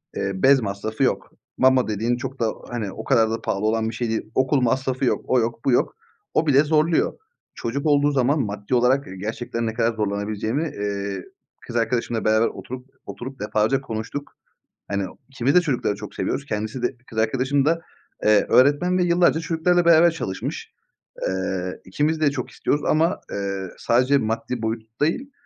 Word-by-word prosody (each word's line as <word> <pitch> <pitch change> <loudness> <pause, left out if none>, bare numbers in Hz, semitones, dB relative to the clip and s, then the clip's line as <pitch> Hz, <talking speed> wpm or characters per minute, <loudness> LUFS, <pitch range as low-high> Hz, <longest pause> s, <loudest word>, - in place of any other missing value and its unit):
eee, 95 - -1
bez 135 +7 +5
masrafı 105 +1 -3
yok. - - 0 0.3
Mama 130 -1 +4
dediğin 110 +3 0
çok 130 +2 -6
da, 115 -2 +1 0.2
hani, 110 -5 -3
o - - -7
kadar 115 -5 +3
da 115 - -2
pahalı 100 +2 -1
olan 110 0 +1
bir - - -6
şey 120 -1 -2
değil. 110 - 0
Okul 130 +1 +2
masrafı 130 +2 0
yok. - - +1
O 130 - +3
yok 115 0 -2
bu 135 - +3
yok. 125 - +2 0.4
O 160 - +2
bile 140 0 +5
zorluyor. 155 +2 +2 0.4
Çocuk 140 +5 -3
olduğu 145 -1 +4
zaman 140 +2 +2
maddi 105 0 -2
olarak, 130 +3 +3
eee, 95 - -8
gerçekten 115 +3 -3
ne 110 - -2
kadar 115 0 +1
zorlanabileceğimi, 105 +5 -1 0.2
eee, 100 -2 -3 0.4
kız 120 - -7
arkadaşımla 115 0 0
beraber 110 +1 +4
oturup 125 +1 -8 0.2
oturup 130 +2 -8
defalarca 110 +5 +1
konuştuk. 115 +4 -6 0.5
Hani, 100 -1 -1 0.2
ikimiz 135 0 0
de 180 - +7
çocukları 135 -10 0
çok 105 0 -9
seviyoruz. 140 - -2
Kendisi 110 +1 -3
de, 125 +1 -1
kız 110 - -8
arkadaşım 130 +5 +1
da, 165 +3 +2 0.4
eee, 105 -1 +5
öğretmen 145 +8 +4
ve - - +3
yıllarca 175 -2 +3
çocuklarla 170 +1 +2
beraber 170 0 +7
çalışmış. 95 - -5 0.6
Eee, 95 -1 -3
ikimiz 150 +11 0
de 145 -2 +4
çok 130 -3 -4
istiyoruz. 145 - -1
Ama, 160 +2 +2
eee, 100 -1 -3
sadece 130 +4 +3
maddi 115 0 -2
boyut 110 +1 -5
değil, 215 - 0
120 Hz, 175 wpm, -23 LUFS, 110-140 Hz, 0.6 s, de